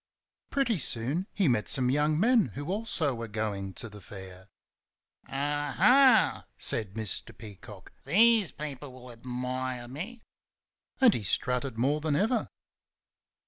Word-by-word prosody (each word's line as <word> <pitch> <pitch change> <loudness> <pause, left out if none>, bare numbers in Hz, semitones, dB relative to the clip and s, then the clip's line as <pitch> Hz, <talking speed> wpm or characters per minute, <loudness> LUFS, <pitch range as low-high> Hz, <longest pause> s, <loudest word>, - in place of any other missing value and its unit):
Pretty 245 -9 0
soon 140 - -2
he 195 -5 +1
met 115 -5 +1
some 125 -1 +2
young 150 +2 +1
men 230 - +4
who 145 +5 -4
also 190 -9 0
were 115 -1 -6
going 105 -2 -3
to 115 - -3
the 105 -1 -12
Fair. 95 -1 -11 0.8
"Aha!" 150 - +3
said 105 -4 0
Mr. 110 -6 -3
Peacock. 100 -4 -12
"These 215 - +4
people 145 -2 -7
will 125 -1 -12
admire 125 +1 -4
me!" 195 - -8 0.8
and 255 -5 +6
he - - -2
strutted 125 +5 -1
more 140 +6 +1
than 150 -2 0
ever. 220 - +1
135 Hz, 130 wpm, -29 LUFS, 115-185 Hz, 0.8 s, and